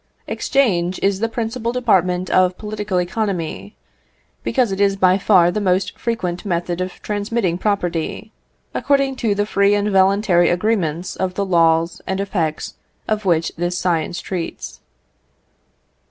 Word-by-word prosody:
Exchange 185 -10 0
is 195 -1 +2
the 225 +1 0
principal 230 +1 -3
department 185 -7 +1
of 185 0 +3
political 210 -3 -2
economy, 175 - -3 0.7
because 240 -3 +1
it 195 +1 -2
is 200 -1 +3
by 185 0 +3
far 185 -3 +4
the 210 - -2
most 185 -1 0
frequent 180 -7 -3
method 175 -2 -2
of 185 0 -5
transmitting 205 -3 -1
property, 180 -4 -2 0.4
according 275 -1 +1
to 220 -5 0
the 205 0 0
free 200 0 +3
and 205 0 0
voluntary 190 -2 +3
agreements 180 -3 -1
of 185 -1 -2
the 200 - -1
laws 165 -2 +2
and 190 0 -2
effects 170 -6 -2 0.3
of 215 -1 -1
which 165 -3 +2
this 175 +1 -1
science 175 -1 -1
treats. 180 -3 -5
190 Hz, 140 wpm, -20 LUFS, 175-210 Hz, 0.7 s, far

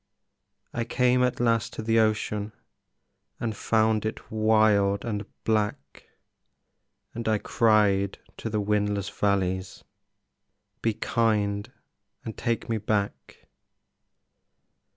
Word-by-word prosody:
I 120 - -1
came 125 +2 +2
at 125 -1 +1
last 115 -2 +1
to 110 - -5
the 115 +1 +3
ocean 105 -1 0 0.9
And 110 -3 -2
found 110 0 +2
it 110 - -5
wild 110 -2 +3
and 105 -2 -3 0.2
black, 105 -11 -2 1.1
And 115 -1 -5
I 110 -1 +3
cried 105 -3 +2 0.2
to 115 - -4
the 105 -1 -1
windless 105 -1 0
valleys, 95 -3 -1 1.0
"Be 115 -2 0
kind 105 -3 0 0.5
and 110 - -5
take 115 -3 -2
me 115 -1 -1
back!" 100 -10 -3
110 Hz, 105 wpm, -26 LUFS, 100-115 Hz, 1.1 s, the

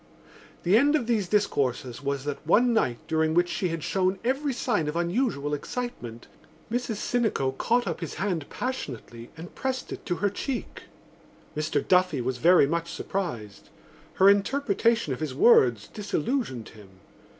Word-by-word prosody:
The 185 +5 +5
end 290 +5 +4
of 290 - 0
these 220 -5 0
discourses 135 - 0
was 140 -1 -2
that 145 0 -5
one 240 +7 +4
night 125 - +1
during 160 0 +1
which 175 0 +3
she 175 +2 -1
had 165 -1 -4
shown 190 0 0
every 270 +4 0
sign 225 - -1
of 150 - -3
unusual 170 - 0
excitement, 140 - -5 0.5
Mrs 245 -2 -1
Sinico 215 - 0
caught 240 - +1
up - - -3
his 165 - -5
hand 180 -7 -2
passionately 125 - -5
and 170 +3 -9
pressed 265 -1 -3
it - - -9
to 175 - 0
her 205 +2 0
cheek. 260 +5 -5 0.7
Mr 155 +1 -1
Duffy 180 -5 +3
was 125 0 -2
very 175 +2 +6
much 170 +3 -2
surprised. 120 - -5 0.5
Her 190 - +5
interpretation 220 - +2
of 125 - -6
his 150 -5 -4
words 125 - +5
disillusioned 205 - -3
him. 105 -3 -15
175 Hz, 155 wpm, -26 LUFS, 140-230 Hz, 0.7 s, very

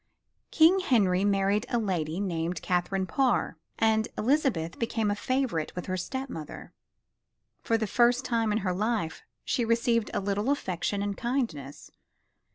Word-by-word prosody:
King 330 +4 +5
Henry 200 - +2
married 200 +2 +1
a 240 - +1
lady 180 -6 -1
named 170 -3 -2
Catherine 185 +1 0
Parr 260 +5 0 0.2
and 220 0 +2
Elizabeth 230 - 0
became 225 -2 0
a - - 0
favorite 245 - -1
with 180 - -5
her 185 - -2
step 260 +9 -4
mother. 160 - -8 0.9
For 225 - +1
the 220 - -1
first 240 +4 +3
time 230 -3 +1
in 210 - +1
her 180 - +1
life 210 -4 -1 0.2
she 245 - 0
received 230 -1 +1
a - - -1
little 205 +4 -1
affection 200 -6 -1
and 205 -1 -2
kindness. 225 - -3
210 Hz, 150 wpm, -28 LUFS, 185-240 Hz, 0.9 s, King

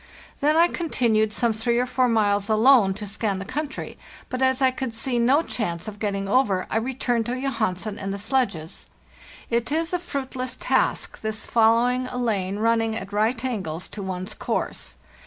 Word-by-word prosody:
Then 300 +2 +3
I 340 +1 +6
continued 235 -12 +1
some 230 +1 +1
three 235 +2 0
or 250 - +2
four 255 0 +1
miles 205 -3 +2
alone 220 -3 +5
to 210 +1 -6
scan 205 0 -1
the 195 - -5
country, 290 +6 -5 0.3
but 255 - -3
as 260 0 +3
I 260 -1 +4
could 255 -3 -4
see 245 +1 0
no 265 +7 +4
chance 170 - -3
of 210 -1 -7
getting 200 -2 -2
over, 200 -5 +2
I - - +1
returned 240 -1 -1
to 250 +1 -2
Jo 275 +1 -1
hansen 205 -2 -2
and 195 0 -3
the 200 - -3
sledges. 205 - -2 0.6
It 235 +3 0
is 325 +3 0
a 360 - +1
fruitless 260 -6 -4
task, - - 0
this 220 0 -4
fol 225 -1 +4
lowing 250 +2 +1
a 250 - -6
lane 200 -5 -1
running 225 0 +1
at 200 -2 -6
right 225 +4 +1
angles 185 -9 -3
to 210 - -7
one's 190 +1 -4
course. - - -3
230 Hz, 190 wpm, -24 LUFS, 205-255 Hz, 0.6 s, I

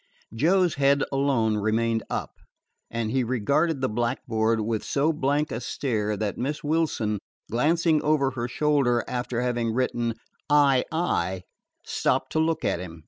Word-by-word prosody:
Joe's 175 +8 +3
head 140 0 +4
alone 135 -6 +1
remained 115 +2 +1
up, - - -3 0.6
and 115 -1 -2
he 130 0 +1
regarded 135 +6 +1
the 130 - +2
blackboard 115 -1 0
with 110 0 -1
so 150 +3 +1
blank 145 +1 0
a 115 - -3
stare 110 -5 -2
that 105 -1 -3
Miss 150 +5 -3
Wilson, 145 -9 0 0.3
glancing 155 +6 +2
over 145 -3 +2
her 120 -2 -3
shoulder 135 -3 +1
after 125 -1 -2
having 120 -2 0
written 120 -2 0 0.4
"II," 140 - +2 0.4
stopped - - 0
to 160 - 0
look 160 0 0
at - - 0
him. 85 -2 -8
125 Hz, 140 wpm, -25 LUFS, 115-150 Hz, 0.6 s, head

